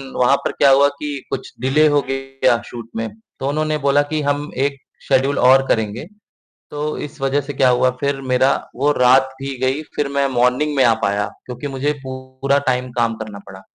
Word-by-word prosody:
वहाँ 125 +2 +4
पर - - 0
क्या 140 - +3
हुआ 140 +1 +6
कि 145 -1 -4
कुछ - - -5
डिले 150 +4 +3
हो 145 -1 +3
गया 135 -2 0
शूट 115 -1 -9
में। 115 0 -2 0.3
तो 135 - -2
उन्होंने 155 +1 0
बोला 140 +1 +4
कि 155 -1 0
हम 145 +1 -1
1 140 -1 -2 0.3
शेड्यूल 135 +2 +2
और 135 +2 +5
करेंगे, 110 +5 -1 0.7
तो 150 +1 -3
इस 150 0 -7
वजह 135 +1 +1
से 140 +1 -7
क्या 130 -1 +3
हुआ, 125 +1 +3
फिर 140 -1 -1
मेरी 130 0 +2 0.3
वो 145 +2 +3
रात 130 +1 +5
भी 135 -1 -4
गई, 130 +4 0
फिर 145 - 0
मैं 140 0 +1
मॉर्निंग 130 +4 +1
में 135 - +4
आ 115 - +5
पाया 100 +1 +1 0.2
क्योंकि 125 +3 -6
मुझे 140 +2 -1
पूरा 130 +1 -2
टाइम 125 0 0
काम 115 -1 0
करना 110 -2 -7
पड़ा। 95 -1 -11
135 Hz, 195 wpm, -19 LUFS, 125-145 Hz, 0.7 s, हुआ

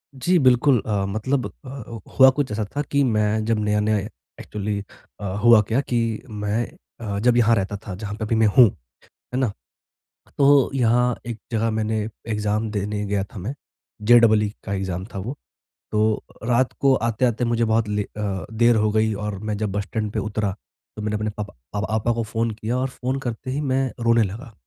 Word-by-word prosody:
जी, 175 +7 +2
बिल्कुल 130 -1 +4
अ, 100 -2 0
मतलब 110 +7 -1 0.2
अ, 120 -4 -8 0.2
हुआ 130 0 +10
कुछ 130 -3 -1
ऐसा 105 +1 -1
था 145 - +1
कि 140 0 +3
मैं 110 -2 +1
जब 115 -1 +1
नया-नया 105 0 +1 0.4
एक्चुअली 105 0 -3 0.4
अ, 105 - -6 0.2
हुआ 120 -2 +8
क्या 115 +3 +1
कि 120 -3 -1 0.3
मैं 105 +2 -1 0.4
अ, 100 -2 -3
जब 120 +2 +3
यहाँ 115 -1 +5
रहता 100 0 -2
था, 95 - -4
जहाँ 105 +1 -6
पे 110 - -5
अभी 115 - 0
मैं 110 -1 +4
हूँ, 125 -2 +10 0.7
है 130 - 0
ना? 130 -5 +1 0.9
तो 140 -2 +5
यहाँ 125 -1 +2
एक 120 -2 -4
जगह 115 0 +1
मैंने 110 0 -1 0.3
एग्ज़ाम 105 0 -1
देने 105 0 -2
गया 100 -1 0
था 100 - -11
मैं, 105 +9 -4 0.5
जे 120 +3 +7
डबल 110 -2 +5
ई 105 - -1
का 95 - -4
एग्ज़ाम 95 -1 -3
था 100 - -3
वो। 120 +9 -5 0.6
तो, 110 0 +1 0.2
रात 120 +2 +2
को 135 -1 +5
आते-आते 120 +1 +1
मुझे 115 0 +1
बहुत 110 0 +1
ले 105 0 0
अ, 100 -2 -4
देर 120 +1 +4
हो 110 0 +2
गई 110 0 +2
और 105 -1 -4
मैं 105 +1 -3
जब 105 -3 -2
बस 100 +1 -1
स्टैंड 105 +1 -3
पे 110 - -2
उतरा, 105 -1 -1 0.4
तो 105 - -5
मैंने 105 0 -1
अपने 105 0 -2
पप 105 -1 -6 0.2
प 105 0 -1
पापा 110 +2 +1
को 115 - -1
फ़ोन 115 +1 -1
किया 110 +2 -3
और 130 +1 0
फ़ोन 130 +1 -3
करते 120 0 -5
ही 135 +3 -1
मैं 135 -2 0
रोने 115 0 +4
लगा। 110 +4 -5
110 Hz, 200 wpm, -23 LUFS, 105-120 Hz, 0.9 s, हुआ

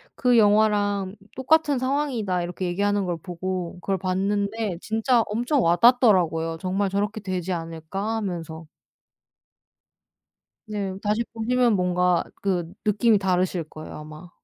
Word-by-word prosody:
"그 245 -2 +3
영화랑 205 -2 +2 0.2
똑같은 295 +2 +2
상황이다." 255 -9 -1
이렇게 180 +1 -4
얘기하는 200 +2 0
걸 175 -2 -2
보고 180 +1 -5
그걸 195 +1 -1
봤는데 200 +1 -1
진짜 225 +2 +2
엄청 245 +6 0
와닿더라고요, 175 -5 +4
'정말 195 +2 -1
저렇게 205 +2 -2
되지 185 -2 -3
않을까?' 165 +6 -4
하면서. 165 -5 -5 2.0
네. 200 -3 -3
다시 215 +3 0
보시면 235 0 +2
뭔가 180 -1 +1 0.2
그 180 -4 -1
느낌이 215 +1 +3
다르실 185 -2 0
거예요 155 0 -9
아마. 155 +3 -11
195 Hz, 285 characters per minute, -24 LUFS, 180-220 Hz, 2.0 s, 와닿더라고요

